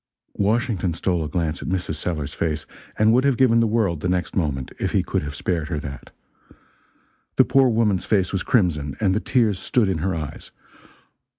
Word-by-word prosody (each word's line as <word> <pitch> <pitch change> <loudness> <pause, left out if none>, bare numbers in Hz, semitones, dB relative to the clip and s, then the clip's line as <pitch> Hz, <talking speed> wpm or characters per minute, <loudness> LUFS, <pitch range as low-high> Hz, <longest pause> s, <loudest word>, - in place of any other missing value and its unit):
Washington 100 -4 0
stole 85 -1 0
a 75 - -4
glance 85 -2 -2
at - - -5
Mrs. 90 -3 -1
Sellers's 75 -2 -3
face, 75 -3 -2 0.3
and 110 +1 +4
would 125 +2 +4
have 140 -3 +2
given 120 -3 +4
the 115 - +3
world, 105 -7 +1
the 90 - -2
next 90 0 -1
moment, 70 -7 -1
if - - -2
he - - +2
could - - -1
have 75 0 -6
spared 85 0 -2
her 80 -4 -2
that. 70 -2 -8 1.3
The - - +5
poor 135 -1 +4
woman's 110 -5 +1
face 95 -4 +1
was 95 - 0
crimson, 75 - +1
and 95 -3 +2
the 105 - +1
tears 110 -6 +1
stood 120 -5 +1
in 95 -4 -1
her 95 +3 -1
eyes. 75 -3 -6
90 Hz, 195 wpm, -23 LUFS, 80-110 Hz, 1.3 s, The